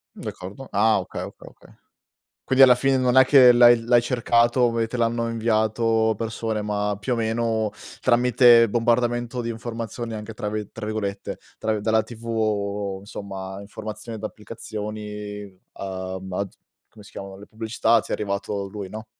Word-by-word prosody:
D'accordo. 100 +9 -8
Ah, 110 +2 +3
okay, - - -6
okay, - - -11
okay. - - -17 0.7
Quindi 130 0 +4
alla 125 - +7
fine 135 +1 +2
non 125 0 +2
è 130 - +9
che 130 -2 +7
l'hai 120 -1 +7
l'hai 120 0 +4
cercato 120 0 +2
e 115 - +1
te 120 +2 -5
l'hanno 115 0 0
inviato 110 0 +1
persone, 115 -1 -3
ma 105 0 -1
più 125 +4 -1
o - - -3
meno, 110 -1 0 0.3
tramite 120 -1 +5
bombardamento 120 +2 0
di 115 - -4
informazioni, 115 0 -5
anche, 110 0 -7
tra 105 0 -4
vi 105 -1 -4
tra 115 - -8
virgolette 105 -2 -4 0.2
tra 110 0 -1
vi 105 - -3
dalla 110 +1 +2
TV, 105 -4 -2
insomma, 95 -1 -7
informazioni 110 +2 -7
d'applicazioni 105 -2 -7
a 95 -1 -5
baz 95 +1 -5 0.3
come 105 - -15
si - - -15
chiamano 95 0 -9
le 100 - -12
pubblicità, 115 +1 +1
ti - - -12
è - - -1
arrivato 100 -1 -3
lui, 100 -1 -7
no? 110 +2 -8
110 Hz, 160 wpm, -23 LUFS, 105-120 Hz, 0.7 s, è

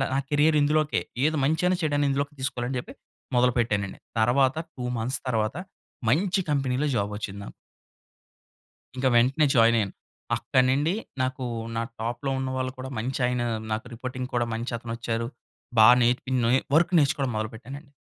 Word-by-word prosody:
నా 135 - +2
కేరియర్ 150 +1 +4
ఇందులోకే, 150 -4 +2 0.2
ఏది 155 0 +2
మంచైనా 180 +5 +2
చెడైనా 145 -2 +1
ఇందులోకి 140 +2 -1
తీసుకోవాలని 125 -1 -2
చెప్పి - - -12 0.4
మొదలుపెట్టానండి. 120 -5 +1 0.2
తరువాత 130 +5 +3 0.2
2 125 - -6
మంత్స్ 125 +4 -2
తర్వాత 110 0 0 0.5
మంచి 190 - +2
కంపెనీ‌లో 135 0 0
జాబ్ 100 0 0
వచ్చింది 100 -1 -6
నాకు. - - -9 1.5
ఇంక 130 - -2
వెంటనే 130 +6 +4
జాయిన్ 115 0 +6
అయ్యాను. 100 -3 -1 0.4
అక్కడి 130 -1 +2
నుండి 150 +6 +1 0.3
నాకు 130 0 -2 0.3
నా 115 - 0 0.2
టాప్‌లో 120 +4 -3
ఉన్నవాళ్లు 130 -1 -2
కూడా 130 +1 -6
మంచి 125 +5 -2
ఆయన 125 -1 0 0.3
నాకు 110 +3 -2
రిపోర్టింగ్ 125 +1 -5
కూడా 120 -1 +1
మంచి 115 +2 -3
అతనొచ్చారు. 115 0 -3 0.5
బాగా 110 +3 +9
నేర్పినొయి 125 +1 +2 0.2
వర్క్ 170 +2 +4
నేర్చుకోవడం 135 -2 +1
మొదలుపెట్టానండి. 120 +6 -6
130 Hz, 140 wpm, -26 LUFS, 115-140 Hz, 1.5 s, బాగా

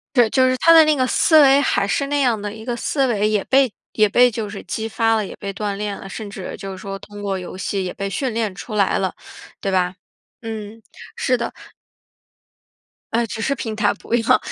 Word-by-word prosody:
对， 240 -3 +5
就 260 +2 +3
是 255 - 0
他 330 +5 +6
的 325 -1 +9
那 305 0 +3
个 260 -2 +1
思 310 +4 +5
维 275 0 +6
还 200 -7 +1
是 275 +7 0
那 290 0 0
样 235 -5 +1
的 205 0 -5
一 220 0 -10
个 240 -1 -2
思 270 +3 0
维， 210 -3 +1
也 210 -2 +1
被 265 -2 +3 0.2
也 215 -1 +3
被 245 +4 +5
就 220 -2 -4
是 205 - -8
激 220 0 -4
发 225 +1 +2
了， 215 -2 0
也 - - -8
被 200 -1 -6
锻 205 0 -3
炼 205 0 -3
了， 195 - -9
甚 210 +1 -7
至 195 -2 -7
就 195 -1 -7
是 190 - -8
说 195 0 -6
通 205 +1 -11
过 195 -1 -2
游 180 -1 -7
戏 195 0 -2
也 180 - -4
被 195 0 -4
训 250 +5 -2
练 220 -3 -1
出 215 +2 -7
来 200 -2 +2
了， 190 -1 -1 0.5
对 195 - -1
吧？ 180 -1 +1 0.5
嗯， 220 -1 -7 0.3
是 255 -1 +1
的。 235 0 -3 1.6
哎， 235 +1 +2
只 220 0 -6
是 275 +4 0
平 225 -4 -4
台 210 -1 +2
不 210 - -8
一 240 - +4
样， - - +5
220 Hz, 250 characters per minute, -20 LUFS, 200-245 Hz, 1.6 s, 的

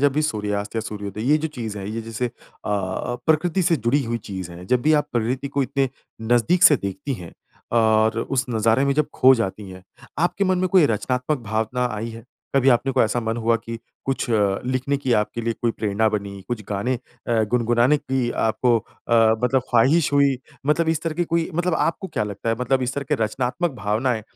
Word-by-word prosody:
जब 140 - +2
भी 155 - +1
सूर्यास्त 105 -6 -2
या - - +1
सूर्योदय, 105 -1 -6
ये 155 - +5
जो 160 +1 -2
चीज़ 110 -3 -4
है, 95 - -6
ये 115 - -3
जैसे 115 +2 -3
अ, - - -6 0.4
प्रकृति 125 - 0
से 170 -1 +3
जुड़ी 125 +4 +1
हुई 115 0 -2
चीज़ 95 -3 -5
है। 85 +1 -10
जब 125 +5 +1
भी 155 +1 +3
आप - - -27
प्रकृति 125 +4 -1
को 140 0 0
इतने 135 0 0 0.4
नज़दीक 145 +10 +3
से 145 - +8
देखती 100 +7 -4
हैं, 90 -7 -10 0.4
और 110 -1 +3
उस 130 +3 -1
नज़ारे 115 +3 +2
में 140 - +2
जब 150 0 +2
खो 130 +1 +6
जाती 105 -3 -3
हैं, 95 0 -11 0.4
आपके 175 +4 +1
मन 185 -1 +2
में 185 0 +1
कोई 180 -4 +5
रचनात्मक 125 +5 -1
भावना 110 +3 -1
आई 110 +2 -4
है? 115 0 -10 0.3
कभी 135 -1 +4
अपने 130 +1 +3
कोई 130 - +3
ऐसा 115 +2 -1
मन 115 0 -2
हुआ 115 0 +2
कि 115 0 -7 0.3
कुछ 135 -2 -2
अ, 100 -3 +2
लिखने 130 +2 0
की 135 -3 -1
आपके 105 +1 0
लिए 115 0 -1
कोई 120 - +2
प्रेरणा 110 0 0
बनी, 100 -2 -4
कुछ 120 -3 -3
गाने 105 +5 -1 0.3
अ, 115 -2 +2
गुनगुनाने 120 +3 +3
की 130 -3 -1
आपको 115 +2 +2
अ, 115 - -5 0.3
मतलब 130 +1 +3
ख़्वाहिश 140 +7 +3
हुई 140 -2 +3 0.3
मतलब 160 +2 +2
इस 160 -1 0
तरह 165 -2 -2
की 175 +2 0
कोई 165 0 -1
मतलब 175 +1 +1
आपको 170 +4 -1
क्या 110 - -1
लगता 105 +2 -5
है 115 - +1
मतलब 130 +1 +1
इस 125 0 -2
तरह 140 - -3
के 150 - +2
रचनात्मक 130 - -1
भावनाएँ 110 +3 0
120 Hz, 210 wpm, -22 LUFS, 110-140 Hz, 0.4 s, से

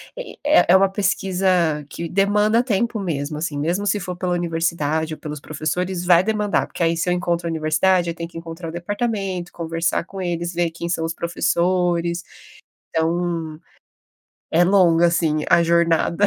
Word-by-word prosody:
eh - - -7
eh 295 +2 +5
eh, 180 - +7
uma 195 0 +5
pesquisa 185 -5 +1
que 170 - -5
demanda 210 +4 +2
tempo 230 -1 -1
mesmo, 150 -5 -3
assim, 155 -2 -3
mesmo 175 +7 -1
se 205 +1 +1
for 180 -1 -5
pela 180 0 -2
universidade 165 -2 -1
ou - - -9
pelos 150 -1 -6
professores 175 +5 -3
vai 175 0 +5
demandar 210 -1 0
porque 170 - -4
aí, 165 0 +2
se 180 - 0
eu - - +3
encontro 175 -1 -1
a - - -1
universidade 170 +3 +2
eu 165 - -4
tenho 170 0 -6
que 165 - -10
encontrar 165 0 -7
o - - -6
departamento, 195 -1 -3
conversar 165 0 -2
com 190 +1 -8
eles, 170 -1 -2
ver 170 -1 0
quem 170 +1 -6
são 170 -1 -1
os 165 - -2
professores, 175 0 0 0.7
então, 165 -1 -1 0.9
é 170 +2 +4
longa, 175 -3 +4
assim, 160 -3 +1
a 170 - +5
jornada. 170 +2 +2
175 Hz, 175 wpm, -21 LUFS, 165-185 Hz, 0.9 s, eh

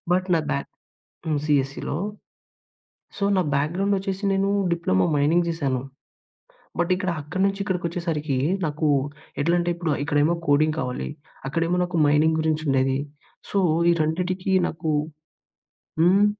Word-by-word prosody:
But 185 +1 +2
నాకు 155 -2 0
బ్యా 140 -1 0 0.7
హ్మ్. 150 -2 +1
సిఎస్ఈ‌‌లో. 140 0 0 1.2
సో, 200 - -1
నా 185 - +3
బ్యాగ్రౌండొచ్చేసి 195 +6 0
నేనూ 195 +1 +1 0.2
డిప్లమో 95 - +2
మైనింగ్ 165 +4 +3
జేశాను. 140 -6 -1 1.0
బట్ 175 +1 +1
ఇక్కడ 185 -1 -1
అక్కడి 175 +6 -3
నుంచి 195 0 -2
ఇక్కడికొచ్చేసరికీ, 170 -6 -2 0.3
నాకు 155 +1 -1 0.5
ఎట్లంటే, 175 +2 +2
ఇప్పుడా 165 -4 -1
ఇక్కడేమో 145 +4 +2
కోడింగ్ 155 +2 +3
కావాలి. 125 0 -3 0.4
అక్కడేమో 165 +4 0
నాకు 175 -2 -2
మైనింగురించుండేది. 150 -3 +2 0.5
సో, 200 - +2 0.3
ఈ - - +5
రెండిటికి 180 +4 -1 0.2
నాకు 160 -1 -3 1.1
హ్మ్? 190 +4 +5
160 Hz, 115 wpm, -24 LUFS, 145-180 Hz, 1.2 s, ఈ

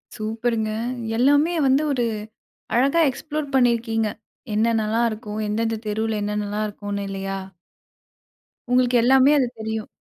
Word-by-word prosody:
சூப்பருங்க! 220 0 -1 0.5
எல்லாமே 290 +6 +4
வந்து 270 +3 +3
ஒரு 245 -3 +1 0.7
அழகா 275 +7 +3
எக்ஸ்ப்ளோர் 300 +2 -4
பண்ணியிருக்கீங்க. 230 -3 +2 0.5
என்னென்னலாம் 225 +1 +2
இருக்கும்? 215 -1 -6
எந்தெந்த 225 +1 -1
தெருவுல 220 +1 -1
என்னென்னல்லாம் 210 0 -2
இருக்கும்னு 205 -1 -5
இல்லையா? 195 0 -4 1.3
உங்களுக்கு 250 0 +3
எல்லாமே 265 +3 +6
அது 255 -3 +2
தெரியும். 220 0 -4
225 Hz, 110 wpm, -23 LUFS, 215-255 Hz, 1.3 s, எல்லாமே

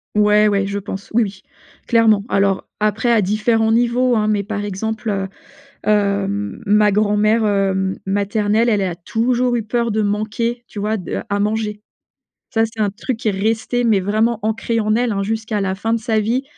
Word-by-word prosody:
Ouais, 210 0 +4
ouais, 200 -1 +1
je 200 0 -3
pense. 195 0 -6
Oui, 235 +1 +4
oui, 195 -2 -6 0.5
clairement. 225 -3 +4
Alors, 195 -1 +1
après 215 +3 +1
à 230 -2 +4
différents 220 +3 +1
niveaux, 240 +2 +2
hein, 215 -1 +1
mais 210 -1 +1
par 205 0 -4
exemple, 220 +3 -3
heu, 195 -2 -1 0.6
heu, 200 -2 +2 0.4
ma 210 +1 +4
grand-mère, 210 +2 +2
heu, 195 -2 +1
maternelle, 205 +3 +1
elle 210 -3 +2
a 185 -2 -1
toujours 240 +7 0
eu 235 - -1
peur 235 +2 -1
de 215 0 0
manquer, 220 +3 -2
tu 205 - -7
vois, 215 +2 -1
de 180 - -4
à 200 0 0
manger. 210 0 -1 0.7
Ça 225 -3 +1
c'est 225 0 -6
un 205 - +2
truc 230 +4 -4
qui 225 - -4
est - - +3
resté 220 +5 -1
mais 220 -4 +3
vraiment 215 +4 0
ancré 220 +2 -1
en 215 0 +1
elle, 240 0 +1
hein, 195 - -1
jusqu'à 220 0 -2
la 190 -1 -1
fin 225 +4 -1
de 230 - +1
sa 220 -1 0
vie, 235 +5 0
215 Hz, 190 wpm, -19 LUFS, 200-225 Hz, 0.7 s, Ouais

